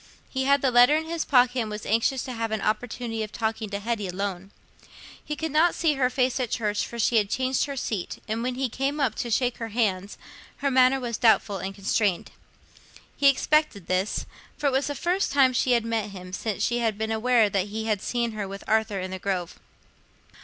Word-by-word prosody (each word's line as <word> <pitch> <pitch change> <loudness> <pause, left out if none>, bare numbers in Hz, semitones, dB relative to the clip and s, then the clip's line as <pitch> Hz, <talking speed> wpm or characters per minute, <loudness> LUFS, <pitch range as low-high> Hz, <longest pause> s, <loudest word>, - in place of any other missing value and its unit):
He 265 0 -1
had 280 +1 +3
the 265 - +3
letter 245 +4 +6
in 320 - -3
his 330 0 -3
pocket, 250 -1 +3
and 225 -2 -2
was 210 0 -6
anxious 230 +4 +1
to 255 - -6
have 225 -1 -2
an 220 0 -2
opportunity 225 +1 -2
of 215 -1 -4
talking 220 -1 -2
to 200 0 -3
Hetty 215 -1 -2
alone. 190 0 -4 0.7
He 300 - -4
could 320 0 -4
not 320 +4 +3
see 325 -3 +2
her 265 -3 +1
face 255 0 0
at 250 -3 -1
church, 210 -3 -1
for 235 - -8
she 230 +1 +2
had 205 -2 +2
changed 260 +2 0
her 280 -1 -6
seat, 210 -7 -3
and 220 +2 -2
when 250 +1 -2
he 265 +1 -1
came 275 +5 -2
up 265 -6 +1
to - - -4
her - - -4
to 225 - +3
shake 250 -2 0
hands, 210 -4 -2 0.4
her 280 -1 -1
manner 260 +1 +4
was 235 -3 -4
doubtful 220 -4 +3
and 190 +2 -5
constrained. 200 -1 0 0.8
He 280 - +3
expected 285 - +1
this, 185 +3 -1 0.3
for - - -5
it 280 - +4
was 265 +2 +1
the 290 - -3
first 360 +6 0
time 270 -2 +4
she 250 +1 +2
had 235 -2 +2
met 225 -2 -1
him 185 -2 -10
since 205 0 -2
she 240 0 +1
had 225 -3 0
been 220 +1 -2
aware 225 0 +3
that 195 -1 -1
he 220 +2 -4
had 210 -3 0
seen 235 -1 -1
her 210 -2 -4
with 195 +1 -8
Arthur 220 -2 +1
in 185 0 -5
the 190 - -5
Grove. 185 -3 -3
230 Hz, 225 wpm, -25 LUFS, 210-260 Hz, 0.8 s, letter